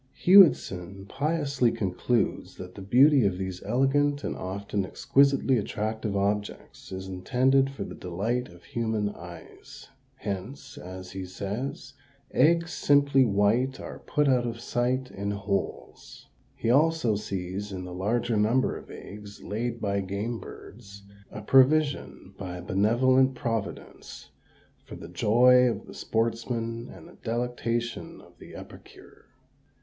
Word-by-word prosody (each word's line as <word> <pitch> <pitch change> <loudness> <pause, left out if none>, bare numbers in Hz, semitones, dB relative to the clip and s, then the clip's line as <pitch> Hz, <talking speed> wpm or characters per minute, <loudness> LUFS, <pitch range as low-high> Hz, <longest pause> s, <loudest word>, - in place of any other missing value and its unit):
"* 135 - -38
Hewitson 95 - +5
piously 140 -3 0
concludes 110 +5 -1
that 90 0 -9
the 100 - -10
beauty 130 +7 +5
of 95 -3 +1
these 95 -1 -5
elegant 140 +5 +1
and - - -3
often 100 +2 -3
exquisitely 135 +5 +2
attractive 110 0 -3
objects 105 +1 -3
is 95 0 -6
intended 130 +8 +2
for 135 - -6
the - - -8
delight 110 +8 -3
of 85 0 -16
human 110 -3 -2
eyes; 85 -3 -12 0.3
hence, 100 +7 -6
as 95 0 -9
he 95 0 -5
says, 120 - -5 0.4
eggs 170 +1 +3
simply 140 -2 +4
white 115 +6 +1
are - - -8
put 150 -1 0
out 125 -2 +2
of 115 0 -5
sight 125 +2 -1
in 100 +1 -4
holes! 100 -1 -4 0.3
He 115 - 0
also 150 -5 +3
sees 100 0 -4
in 95 -1 -5
the 90 - -8
larger 110 +5 0
number 115 +5 +2
of - - -16
eggs 100 0 -10
laid 115 +2 -3
by 100 -2 -1
game 100 +5 -3
birds 100 -2 -12 0.3
a 105 - -8
provision 135 -5 +2
by 90 -2 -5
a 90 - -8
benevolent 130 +7 +3
Providence 115 -3 -5 0.5
for - - -10
the 85 - -10
joy 125 +7 +5
of 115 - -4
the - - -11
sportsman 115 +1 -2
and - - -12
the - - -16
delectation 120 0 -3
of - - -19
the - - -12
epicure. - - -14
115 Hz, 135 wpm, -27 LUFS, 100-130 Hz, 0.5 s, Hewitson